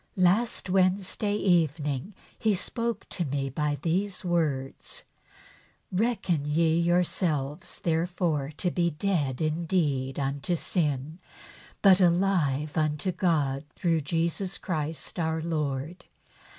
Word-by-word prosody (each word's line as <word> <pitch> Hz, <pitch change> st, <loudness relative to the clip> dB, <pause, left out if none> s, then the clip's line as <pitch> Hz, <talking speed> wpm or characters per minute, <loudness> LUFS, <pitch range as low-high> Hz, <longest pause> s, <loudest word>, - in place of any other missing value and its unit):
Last 190 Hz, +6 st, +2 dB
Wednesday 190 Hz, +2 st, +1 dB
evening 160 Hz, -3 st, +1 dB, 0.2 s
He 215 Hz, -2 st, +1 dB
spoke 230 Hz, +3 st, -3 dB
to 175 Hz, -, -1 dB
me 135 Hz, -2 st, -2 dB
by 150 Hz, +1 st, -1 dB
these 190 Hz, +3 st, -1 dB
words: 150 Hz, -6 st, -1 dB, 0.5 s
' -, -, -28 dB, 0.2 s
Reckon 190 Hz, -6 st, +1 dB
ye 160 Hz, +2 st, +2 dB
yourselves 170 Hz, -3 st, 0 dB
therefore 165 Hz, -3 st, 0 dB
to 180 Hz, 0 st, 0 dB
be 170 Hz, -1 st, +1 dB
dead 150 Hz, -6 st, -1 dB
indeed 155 Hz, -4 st, 0 dB
unto 140 Hz, +5 st, -1 dB
sin, 155 Hz, -2 st, -1 dB, 0.6 s
but 195 Hz, -2 st, +7 dB
alive 170 Hz, -5 st, +2 dB
unto 155 Hz, +3 st, +1 dB
God 155 Hz, -7 st, +1 dB
through 165 Hz, -3 st, +1 dB
Jesus 170 Hz, +5 st, -1 dB
Christ 160 Hz, -1 st, -3 dB
our 160 Hz, -1 st, 0 dB
Lord. 155 Hz, 0 st, -3 dB
165 Hz, 110 wpm, -28 LUFS, 150-185 Hz, 0.6 s, but